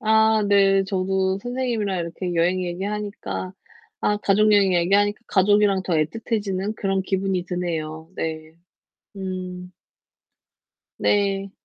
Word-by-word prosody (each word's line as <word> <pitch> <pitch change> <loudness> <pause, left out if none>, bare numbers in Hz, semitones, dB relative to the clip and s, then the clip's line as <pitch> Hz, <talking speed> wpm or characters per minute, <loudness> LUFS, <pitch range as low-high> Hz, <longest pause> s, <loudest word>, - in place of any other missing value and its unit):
아 220 0 +4
네. 195 -1 +4
저도 190 0 0
선생님이랑 240 -6 -2
이렇게 175 +1 -4
여행 180 +2 +2
얘기하니까 200 +1 -4 0.5
아 210 - +1
가족 210 +1 +3
여행 200 -2 +4
얘기하니까 200 +5 +2
가족이랑 200 0 +3
더 185 - -3
애틋해지는 200 +4 -1
그런 195 -1 0
기분이 190 -1 -1
드네요. 160 -3 -4
네. 160 0 -4 0.6
음. 185 -1 -6 1.3
네. 195 -1 +1
195 Hz, 260 characters per minute, -23 LUFS, 180-205 Hz, 1.3 s, 아